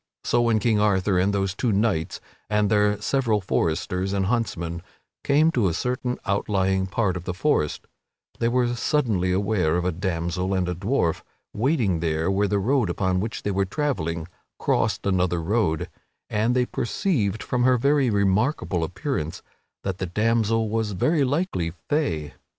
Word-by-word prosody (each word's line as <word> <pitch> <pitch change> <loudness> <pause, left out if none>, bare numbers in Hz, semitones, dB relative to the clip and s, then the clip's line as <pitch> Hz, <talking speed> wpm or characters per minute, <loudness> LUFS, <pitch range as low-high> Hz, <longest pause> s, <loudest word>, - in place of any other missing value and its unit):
So 120 - +2
when 115 -2 +3
King 110 0 +2
Arthur 100 -2 +2
and 95 +3 +2
those 95 -2 0
two 115 +4 0
knights 100 -5 0 0.3
and 105 -1 +1
their 105 -1 +3
several 115 -1 +1
foresters 90 +1 -1
and 100 -1 +1
huntsmen 85 -7 -2 0.4
came 150 +3 +4
to 120 -10 +2
a 85 - -1
certain 125 +4 -2
outlying 95 -1 +1
part 95 -1 0
of 90 -1 -6
the 90 - -3
forest, 95 - 0 0.5
they 115 - +2
were 120 0 +1
suddenly 115 - +1
aware 95 -4 +1
of 90 - -1
a 90 - +2
damsel 90 +1 -2
and 90 -1 0
a 90 - -1
dwarf 95 - 0 0.3
waiting 110 - +1
where 85 +5 +1
the 100 +1 +1
road 120 +1 +1
upon 95 +1 0
which 110 +4 -4
they 105 - -1
were 100 0 +1
travelling 90 - -2 0.3
crossed - - 0
another 90 -3 +1
road, 85 -3 0 0.4
and 110 +3 +1
they 125 -1 +3
perceived, 115 - -1
from 125 - -1
her 125 0 +4
very 140 +1 +2
remarkable 100 - +1
appearance, 85 - -3 0.4
that 95 -2 -3
the 95 - -2
damsel 115 +3 +1
was 110 -1 -1
very 150 - +2
likely 135 - -1 0.2
Fay. 80 - -1
100 Hz, 160 wpm, -24 LUFS, 90-120 Hz, 0.5 s, came